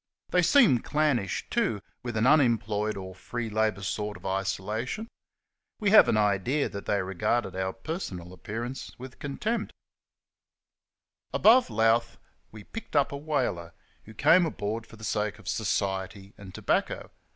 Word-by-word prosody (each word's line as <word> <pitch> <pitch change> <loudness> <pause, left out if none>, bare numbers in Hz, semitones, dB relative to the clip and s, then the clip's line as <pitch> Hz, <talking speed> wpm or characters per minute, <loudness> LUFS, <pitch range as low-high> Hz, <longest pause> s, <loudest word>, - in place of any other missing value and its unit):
They 180 - +4
seemed 175 - +5
clannish, 140 - 0
too, 110 -3 +1 0.2
with 120 -2 -4
an 110 - +2
unemployed 110 -7 +2
or 95 -1 -7
free 115 +4 -5
labour 110 -2 0
sort 105 +2 -3
of - - -17
isolation. 100 - -2 0.7
We 205 -2 +2
have 215 - +8
an - - +3
idea 105 +7 +1
that 100 - -8
they 100 -2 +1
regarded 95 +2 -1
our 95 0 -1
personal 95 - -6
appear 110 +6 -5
ance 125 +2 -7
with 130 0 -10
contempt. 215 +11 -3 1.6
Above 245 +4 +5
Louth 115 +2 +2 0.3
we 110 -1 -11
picked 225 - -9
up 145 -1 +3
a - - -4
"whaler," 140 - -2 0.3
who 110 - -13
came 175 - +5
aboard 115 -4 -4
for - - -14
the 110 - -14
sake 105 -1 -1
of 105 -4 -16
society 95 0 -2
and 100 -2 -11
tobacco. - - -1
110 Hz, 150 wpm, -28 LUFS, 100-135 Hz, 1.6 s, have